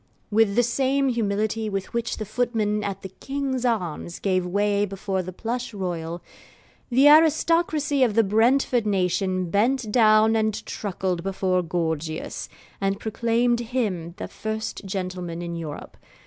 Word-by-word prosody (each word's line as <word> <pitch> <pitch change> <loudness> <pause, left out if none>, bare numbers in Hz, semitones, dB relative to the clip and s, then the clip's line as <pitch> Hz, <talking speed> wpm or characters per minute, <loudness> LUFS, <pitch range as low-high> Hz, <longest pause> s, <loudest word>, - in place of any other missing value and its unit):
With 210 -1 +3
the 245 - +4
same 270 +3 +1
humility 220 -1 -1
with 195 +1 -4
which 235 0 -2
the 215 - -4
footmen 215 -2 0
at 195 -1 -4
the 190 - -6
'King's 270 +4 -3
Arms' 175 -7 -2
gave 185 -2 0
way 205 +2 +1
before 195 -1 -2
the 185 +1 -6
Plush 235 +4 -4
Royal, 170 -3 -4 0.7
the 265 +3 +5
aristocracy 310 -1 +4
of 235 -5 +3
the 225 - +5
Brentford 230 +3 +2
nation 185 -2 0
bent 230 +2 +1
down 220 -1 +5
and 220 -1 0
truckled 185 -3 -3
before 185 -1 0
Gorgius, 160 -2 -3 0.3
and 195 0 0
proclaimed 235 +2 +1
him 210 -9 -2
the - - -5
first 220 -1 -5
gentleman 180 -3 -4
in 170 0 -4
Europe. 160 -3 -7
210 Hz, 140 wpm, -24 LUFS, 185-240 Hz, 0.7 s, the